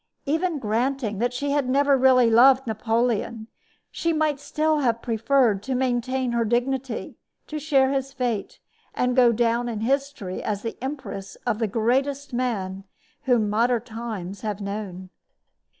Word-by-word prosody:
Even 320 +3 0
granting 230 -2 -1
that 245 +1 +1
she 280 +3 -2
had 280 -3 0
never 280 +1 +4
really 255 -2 +5
loved 260 +4 +6
Napoleon, 225 0 -1 0.5
she 335 - -1
might 305 -2 +1
still 310 +1 0
have 235 -5 +1
preferred 230 -2 +2
to 260 +4 -3
maintain 255 0 0
her 235 -1 +1
dignity, 245 +2 -2 0.3
to 305 - -5
share 275 -3 +3
his 270 0 -2
fate, 245 -6 -3 0.4
and 250 0 +1
to 255 - +6
go 240 -1 +6
down 235 +1 +1
in 220 -2 -4
history 270 -6 -2
as 205 -1 -3
the 230 - -4
empress 265 -8 -6
of 230 -3 0
the 225 - +1
greatest 265 +6 0
man 200 -6 -2 0.4
whom 240 -5 +3
modern 230 +2 +1
times 215 -5 -6
have 210 -2 -3
known. 200 -2 -6
245 Hz, 150 wpm, -24 LUFS, 220-270 Hz, 0.5 s, loved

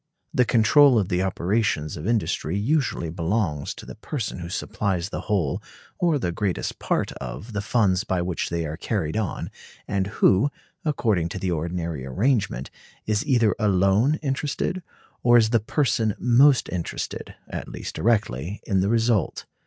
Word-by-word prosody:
The 125 - +4
control 125 +4 +5
of 100 -4 +1
the 90 -1 +1
operations 95 -4 0
of 75 - -5
industry 105 -6 0
usually 120 - 0
belongs 85 -3 -1
to - - -10
the - - -8
person 115 - -4
who 85 0 -6
supplies 95 -1 -2
the - - -4
whole 90 -10 0 0.4
or 170 -4 +3
the 90 -10 -1
greatest 95 +1 -2
part - - 0
of 115 +2 -7
the 105 - -1
funds 105 -3 +2
by 95 -5 -1
which 90 -1 -2
they 85 -1 -2
are 75 +1 -5
carried 90 -4 -2
on, 110 -3 -2 0.4
and 100 -2 0
who, 100 +4 +3 0.3
according 110 - +1
to 95 - -5
the 95 -1 -1
ordinary 85 -3 -3
arrangement, 95 - 0 0.3
is 105 -1 0
either 115 -7 +4
alone 100 +6 +3
interested, 150 +6 -1 0.4
or 120 0 +6
is 110 -1 +4
the 115 - +4
person 115 -3 0
most 130 +3 +5
interested 90 -2 -4
(at - - -6
least - - -6
directly), 105 - 0
in 95 -3 +1
the 95 +2 +1
result. 115 -5 +1
105 Hz, 160 wpm, -24 LUFS, 90-120 Hz, 0.4 s, or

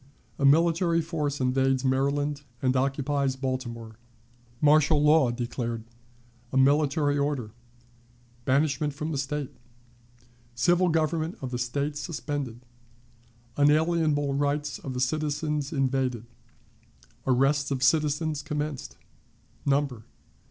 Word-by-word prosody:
A 140 - +2
Military 165 +3 +4
Force 155 -4 -2
invades 130 +1 +1
Maryland 140 +2 0 0.2
and 130 0 +1
occupies 135 0 0
Baltimore. 120 -4 -5 0.6
Martial 150 0 +4
Law 150 -3 +5
declared. 120 -1 -3 0.7
A - - 0
Military 145 +1 +3
Order. 140 -6 -1 0.9
Banishment 145 +2 +1
from 155 +2 -4
the 145 - -2
State. 140 0 -3 1.0
Civil 175 +9 +3
Government 160 +1 0
of 130 -2 -5
the 125 - -3
State 140 +4 -2
suspended. 145 -7 -4 1.0
Unalienable 150 -1 +2
Rights 145 +1 -1
of 130 -2 -6
the - - -2
Citizens 150 +1 -1
invaded. 130 -5 0 1.0
Arrests 135 +3 +2
of 135 -2 -1
Citizens 150 +1 +2
commenced. 150 -3 -4 0.7
Number. 135 -5 0
145 Hz, 100 wpm, -27 LUFS, 130-150 Hz, 1.0 s, Law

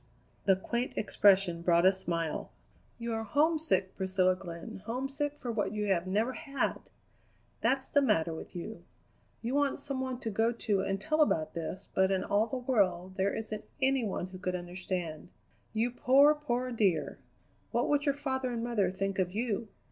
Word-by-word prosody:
The 195 - +6
quaint 235 +6 -2
expression 195 -4 +3
brought 170 0 +4
a 190 - +8
smile. 170 -4 -3 0.5
"You 235 -1 -3
are 225 - -1
homesick, 300 - +1
Priscilla 185 -1 +2
Glenn, 180 +3 -8
homesick 270 +4 -2
for 245 - -4
what 205 -3 -1
you 210 -1 -1
have 175 0 -2
never 215 +7 +1
had! 275 -2 -2 0.8
That's 265 0 +1
the 285 - +5
matter 170 - +2
with 160 - -9
you. 195 +6 -6 0.6
You 235 +3 -2
want 285 -1 +2
some 275 -2 -3
one 260 -1 -3
to 225 - -3
go 225 +3 +2
to 210 -4 0
and 195 0 -1
tell 310 +10 +1
about 160 - +2
this, 170 +3 -5
but 190 0 +3
in 190 -1 +1
all 210 +2 +2
the 260 - -3
world 190 -8 +1
there 195 +1 +1
isn't 215 -1 -4 0.2
any 265 -1 +2
one 195 -4 -2
who 185 -1 -9
could 185 0 -2
understand. 175 -2 -4 0.4
You 225 +2 0
poor, 275 +4 +6
poor 255 -4 -2
dear! 195 -10 +1 0.5
What - - +1
would 290 0 +1
your 280 - +3
father 265 -3 -2
and 235 -1 -3
mother 225 -6 +1
think 195 +1 -2
of 180 -1 +1
you? 225 0 -1
215 Hz, 180 wpm, -31 LUFS, 185-255 Hz, 0.8 s, a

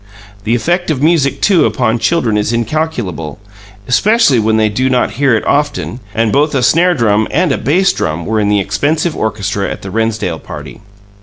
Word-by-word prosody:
The 115 +2 +1
effect 175 +9 -1
of 145 -3 -1
music, 155 -4 +1
too, 185 -7 +3
upon 120 -2 0
children 125 -7 +1
is 105 +1 0
incalculable, 115 - -3 0.5
especially 170 - +3
when 110 0 +1
they 110 -1 +3
do 125 +5 -1
not 125 -1 +1
hear 135 -3 +1
it 110 - -2
often 145 -4 -1 0.2
and 115 -1 +1
both 145 +3 +1
a 130 - +1
snare 175 +9 +3
drum 110 -4 +1
and 165 +2 +1
a - - 0
bass 185 +7 +2
drum 80 0 -3
were 110 0 0
in 105 -1 +1
the 105 0 +2
expensive 145 - -1
orchestra 100 -2 -2
at - - -7
the 95 - -7
Rennsdale 110 -7 -2
party. - - -10
120 Hz, 185 wpm, -14 LUFS, 110-155 Hz, 0.5 s, too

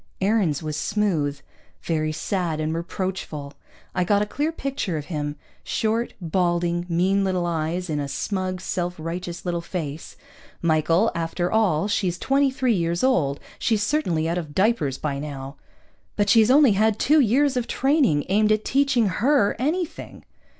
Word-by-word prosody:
Aarons 190 -7 +1
was 155 -1 -3
smooth. 155 -6 0 0.4
Very 155 -2 0
sad 165 0 -2
and 155 +1 -1
reproachful. 170 -4 -4 0.4
I 180 - +1
got 205 +3 +2
a - - -2
clear 295 +9 -2
picture 275 - -3
of 150 - -5
him 145 -1 -2 0.3
short, 225 +2 -1
balding, 175 0 0
mean 190 +4 +2
little 185 -2 0
eyes 170 +2 -2
in 150 -3 -2
a 140 - -2
smug, 185 +5 -3
self 180 -1 -2
righteous 170 +2 -5
little 175 -1 -1
face. 160 -3 -6 0.4
"Michael, 165 +5 +2
after 170 +2 -2
all 200 -6 +2
she's 185 -4 0
twenty 275 +4 +2
three 260 -2 +1
years 170 -2 -1
old. 155 - +2 0.2
She's 220 -3 +1
certainly 180 - 0
out 170 +2 0
of 150 -4 -8
diapers 190 - +1
by 140 -2 -3
now." 140 -1 -7 0.6
"But 205 -1 +1
she's 225 0 +5
only 275 -1 +6
had 215 +1 +2
two 305 +7 +4
years 270 +3 +3
of 245 -2 -1
training 265 - +2
aimed 210 +3 +3
at 215 0 +1
teaching 270 -4 +2
her 210 - +2
anything." 320 +6 -3
180 Hz, 155 wpm, -24 LUFS, 160-220 Hz, 0.6 s, only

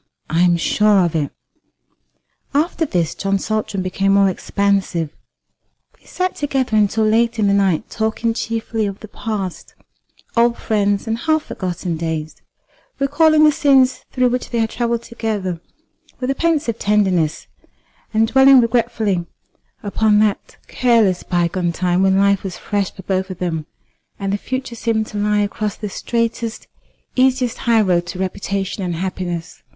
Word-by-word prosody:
"I 165 +2 +2
am 175 -1 +4
sure 205 +2 +3
of 170 - -2
it." 150 -3 -1 1.2
After 320 +2 +1
this 170 - 0
John 195 0 -1
Saltram 210 -1 -2
became 195 +1 +1
more 200 -1 +5
expansive. 190 -5 -1 0.9
They - - -25
sat 370 0 -2
together 270 -5 -1
until 215 +1 +2
late 230 +2 +2
in 215 - +2
the 200 - +3
night, 195 -2 +1
talking 220 +1 -1
chiefly 225 -1 -2
of 195 0 -7
the 215 - -9
past, 205 -4 -5 0.6
old 235 0 +3
friends, 205 -2 0
and 225 0 -2
half 315 +3 +1
forgotten 175 -2 -4
days; 160 -1 -4 0.6
recalling 305 +3 +4
the 305 - +7
scenes 270 -3 +3
through 255 -1 +2
which 250 +1 -2
they 235 - -2
had 225 -1 0
travelled 235 -1 -1
together 210 -7 -3 0.6
with 255 +1 -1
a - - +1
pensive 300 -7 0
tenderness, 190 -7 +1 0.7
and 225 0 +2
dwelling 265 +2 +7
regretfully 225 -6 0 0.6
upon 210 +1 +2
that 210 -1 0
careless 225 -7 +2
bygone 175 0 0
time 180 +1 0
when 190 0 +3
life 200 -1 +3
was 190 -2 -5
fresh 200 -3 -2
for 190 - -12
both 190 0 -1
of 185 - -6
them, 165 -4 -3 0.5
and 195 -1 -2
the - - +1
future 260 +1 -4
seemed 225 -1 -1
to 210 - -6
lie 210 0 +2
across 205 0 -2
the 210 - -5
straightest, 230 +1 -3 0.5
easiest 255 -2 +2
high 225 -1 +5
road 175 -3 +1
to 180 - -6
reputation 195 +1 -3
and 175 -2 -2
happiness. 175 -1 -4
210 Hz, 155 wpm, -19 LUFS, 185-235 Hz, 1.2 s, the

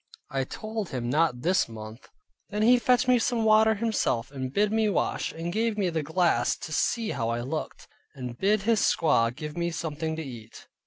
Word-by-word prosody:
I 135 -1 -1
told 215 +4 -5
him 120 -2 -3
not 150 -4 +1
this 180 -5 +2
month. 110 +1 -10 0.4
Then 210 +1 -1
he 245 +2 +6
fetched 250 +1 +2
me 250 -1 +5
some 230 0 0
water 220 0 +5
himself, 205 - -1
and 130 -2 -5
bid 205 +6 +1
me 220 -1 +2
wash, 200 - -1
and 170 +1 -5
gave 225 0 0
me 190 -4 0
the 160 -1 -1
glass 160 -5 +1
to 155 - -7
see 225 +6 0
how 115 0 -2
I 115 +1 -1
looked; 140 +6 -5 0.3
and 125 -3 -6
bid 200 - +1
his 225 -1 +2
squaw 115 -8 +3
give 150 +5 -7
me 170 0 -1
something 160 -1 -3
to 160 - -4
eat. 115 -5 -10
165 Hz, 200 wpm, -27 LUFS, 130-215 Hz, 0.4 s, he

